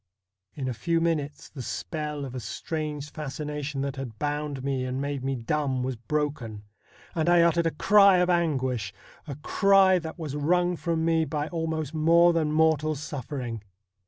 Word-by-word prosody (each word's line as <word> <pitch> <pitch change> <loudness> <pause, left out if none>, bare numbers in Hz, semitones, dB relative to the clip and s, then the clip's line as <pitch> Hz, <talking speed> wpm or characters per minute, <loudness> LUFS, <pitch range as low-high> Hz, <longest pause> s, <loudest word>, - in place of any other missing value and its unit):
In 135 -3 -3
a 130 - -1
few 165 +9 0
minutes 150 -4 -1
the 140 - -9
spell 150 +2 -4
of 130 - -8
a 130 - -4
strange 150 +4 -4
fascination 150 -1 -4
that 140 -1 -3
had 125 -5 -6
bound 145 -1 -3
me 135 -2 -1
and 130 +1 -3
made 140 -1 -3
me 135 0 -1
dumb 130 +1 -1
was 130 0 -2
broken, 120 -4 -3 0.5
and 165 0 +1
I 175 -1 +6
uttered 170 0 +3
a 160 - -3
cry 200 -2 +6
of 180 0 +3
anguish 130 - 0
— - - -25
a 140 - -5
cry 190 +4 +4
that 160 0 -7
was 155 -4 -5
wrung 175 +4 +2
from 165 -1 -1
me 165 -1 +3
by 150 +1 -3
almost 160 -3 -3
more 170 +2 +5
than 160 -2 +1
mortal 155 -1 +2
suffering. 130 -5 -5
150 Hz, 175 wpm, -27 LUFS, 135-165 Hz, 0.5 s, I